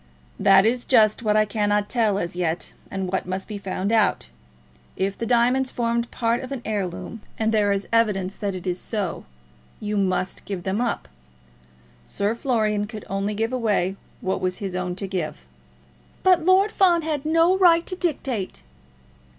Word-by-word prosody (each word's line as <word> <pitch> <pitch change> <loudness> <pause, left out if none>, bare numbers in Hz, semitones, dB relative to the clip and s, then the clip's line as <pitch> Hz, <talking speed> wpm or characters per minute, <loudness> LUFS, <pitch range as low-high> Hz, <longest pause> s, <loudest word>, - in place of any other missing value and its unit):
"That 195 0 +6
is 240 +2 +1
just 220 -4 +4
what 215 -2 +2
I 215 - +4
cannot 205 0 0
tell 220 -4 +1
as 175 -3 -3
yet, 175 -1 -2 0.2
and 190 -1 -3
what 190 - -1
must 185 +1 -4
be 210 -2 -6
found 195 +1 -2
out. 215 - +2 0.7
If 195 +1 -1
the 230 - -4
diamonds 250 +2 +3
formed 235 0 -1
part 235 +1 0
of 260 0 -8
an 265 -3 -5
heirloom, 205 +1 -4 0.2
and 220 0 +1
there 210 -2 +2
is 200 0 -1
evidence 205 -4 +2
that 200 -3 -3
it 185 - -7
is 180 -1 -1
so, 200 -6 -3 0.5
you 210 0 -2
must 185 -1 -1
give 190 -3 -5
them 195 +4 -1
up. 235 - -2 1.0
Sir 200 +2 -1
Florian 215 -4 0
could 215 -2 -8
only 200 +2 -1
give 225 +3 -1
away 205 -6 +1 0.3
what 190 - -1
was 185 0 -1
his 195 -3 -4
own 180 -1 -2
to 195 - -4
give." 165 - -4 0.8
"But 365 -3 +5
Lord 380 +4 +4
Fawn 350 -4 +3
had 300 -3 -2
no 330 +4 +3
right 345 -3 +5
to 370 - -4
dictate." 265 - -2
210 Hz, 175 wpm, -23 LUFS, 195-240 Hz, 1.0 s, That